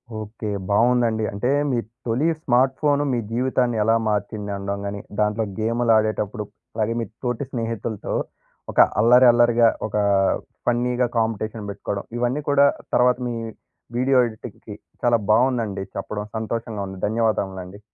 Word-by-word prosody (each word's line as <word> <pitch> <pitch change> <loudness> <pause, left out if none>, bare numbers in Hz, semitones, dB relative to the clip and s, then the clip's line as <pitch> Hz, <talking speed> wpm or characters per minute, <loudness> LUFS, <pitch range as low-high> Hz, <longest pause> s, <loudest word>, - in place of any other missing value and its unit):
Okay. 110 0 -6 0.2
బావుందండి. 115 +1 +3
అంటే, 100 +6 -1 0.2
మీ 125 - +1 0.3
తొలి 125 +8 +1
స్మార్ట్ 130 -2 +2
ఫోను 145 -1 +3
మీ 120 - +1
జీవితాన్ని 125 -1 +1
ఎలా 115 +1 +3
మార్చింది 105 0 -2
అనడం 100 0 -3
గానీ, 100 0 -4 0.2
దాంట్లో 105 +1 +1 0.2
గేములాడేటప్పుడు, 110 -1 +1 0.3
అలాగే 110 +1 0
మీ - - -2 0.2
తోటి 125 +2 -1
స్నేహితులతో, 115 -2 -3 0.6
ఒక - - -1 0.2
అల్లరి, 125 +3 +6
అల్లరిగా 120 0 +4 0.2
ఒకా 105 0 0 0.6
ఫన్నీగా 120 +1 +1
కాంపిటీషన్ 110 -1 -2
బెట్టుకోడం, 100 0 -5
ఇవన్నీ 125 +4 0
కూడా, 140 0 +5 0.3
తర్వాత 125 0 +4
మీ 120 - -3 0.6
వీడియో 130 +1 +3
ఎడిటింగ్‌కి 110 -1 -10 0.3
చాలా 120 -1 +4
బావుందండి 115 -4 +2
చెప్పడం, 105 +1 -4
సంతోషంగా 110 -1 -3
ఉంది. 95 -1 -8
ధన్యవాదములండి. 100 -4 -1
115 Hz, 125 wpm, -23 LUFS, 105-120 Hz, 0.6 s, అల్లరి